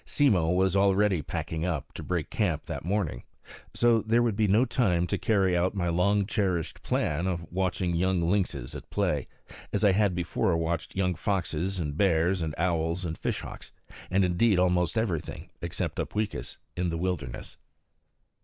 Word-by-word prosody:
Simmo 100 - +2
was 95 +1 +2
already 100 -2 +3
packing 80 +3 -4
up, 85 -6 -3
to - - -7
break - - -3
camp - - 0
that - - -5
morning. 90 -9 -1 0.5
So 120 -2 +4
there 115 +3 +2
would 115 -4 +1
be 110 0 +2
no 110 +6 +4
time 100 -9 +1
to 90 - -1
carry 95 -5 +2
out 90 +3 +1
my 90 -3 0
long 100 +4 +2
cherished 95 -6 -1
plan 80 +5 0
of 85 -3 -2
watching 90 -1 0
young 95 +1 +1
lynxes 85 -9 -1
at - - -9
play, - - 0 0.4
as 105 - -1
I 100 - +6
had 100 -1 +2
before 90 0 0
watched 80 0 -2
young 90 -1 +1
foxes 95 0 -2
and 75 -4 -3
bears 90 0 +2
and 80 -2 -3
owls 85 0 0
and 80 -1 -3
fish - - -2
hawks, - - -9 0.4
and 95 +1 +3
indeed 95 +3 +3
almost 90 +1 +2
everything, 95 -9 -2
except - - -3
Upweekis, 105 0 -3 0.2
in 90 0 -1
the 85 - -2
wilderness. 85 -9 -4
90 Hz, 170 wpm, -28 LUFS, 85-100 Hz, 0.5 s, I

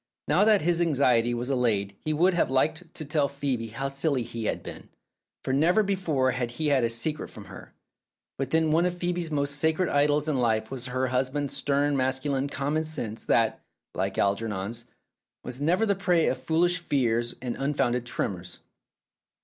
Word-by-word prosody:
Now - - +4
that 215 -5 +4
his 175 +1 +2
anxiety 130 -7 +3
was 120 +3 -2
allayed 105 -6 0
he 155 - 0
would 175 +5 +3
have 170 - +1
liked 155 +6 0
to 155 - -6
tell 145 -1 +1
Phcebe 130 -6 -3
how 135 +4 -2
silly 140 -1 -1
he 115 -1 -6
had - - -2
been, - - -9 0.5
for 130 - -1
never 175 +9 +4
before 165 -10 +1
had 125 -1 -2
he 155 -1 0
had 135 -3 +3
a 115 - +2
secret 120 +7 -2
from - - -11
her. - - -12 0.6
But 135 - -2
then 160 -1 +2
one 170 +3 +3
of 175 0 -4
Phoebe's 175 -1 -2
most 145 -1 -1
sacred 160 +3 +1
idols 145 +1 +2
in 145 -4 +1
life 110 -2 0
was 130 -1 -4
her 130 +1 -1
husband's 130 +2 -1
stern 145 0 +1
masculine 135 +1 0
common 145 +3 -1
sense 115 -8 -5
that 115 -1 +2 0.3
(like - - -2
Algernon's) 105 +2 -1 0.6
was 125 +2 -5
never 180 +9 +2
the 200 - +2
prey 180 -4 +2
of 130 - -1
foolish 175 +6 +2
fears 120 -7 0
and 125 -2 -4
unfounded 130 -4 0
tremors. 90 -6 -4
140 Hz, 180 wpm, -27 LUFS, 120-160 Hz, 0.6 s, Now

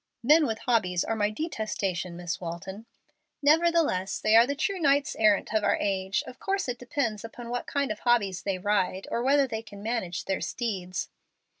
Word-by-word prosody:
"Men 300 +5 +5
with 220 -1 -2
hobbies 185 -8 +2
are 225 - -2
my 210 -1 +1
detestation, 210 - -3
Miss 175 0 -4
Walton." 190 +6 -7 0.6
"Nevertheless, 310 - +3
they 215 +1 +3
are 230 +2 +7
the 280 - -1
true 380 +6 -1
knights 285 -2 +2
errant 215 -1 +3
of 215 -1 +2
our - - +3
age. 190 -1 0
Of 250 - -11
course 390 -3 -1
it 245 -1 -3
depends 240 -4 -2
upon 235 +1 -8
what 245 - -3
kind 280 -4 -1
of 215 - -4
hobbies 200 -7 +1
they 195 -1 -2
ride, 190 -1 0
or 235 - 0
whether 275 +2 +4
they 220 -4 -4
can 205 -2 -12
manage 215 -7 -2
their 190 - -1
steeds." 190 -7 -3
220 Hz, 185 wpm, -27 LUFS, 190-255 Hz, 0.6 s, are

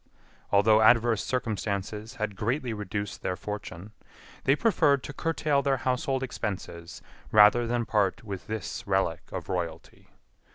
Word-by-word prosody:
Although 110 +2 +5
adverse 115 -1 +4
circumstances 105 -2 -3
had 110 -4 -3
greatly 120 +4 -1
reduced 105 -1 -4
their 90 - -2
fortune, 105 -1 -7 0.5
they 135 - +5
preferred 145 - +3
to 140 - -7
curtail 155 -2 0
their 135 -1 +1
household 130 +1 -1
expenses 90 -8 -5 0.3
rather 110 +3 +6
than 120 0 0
part 105 +2 0
with 100 -4 -7
this 110 -3 -5
relic - - +1
of - - -5
royalty. 85 -3 -5
110 Hz, 130 wpm, -28 LUFS, 100-125 Hz, 0.5 s, rather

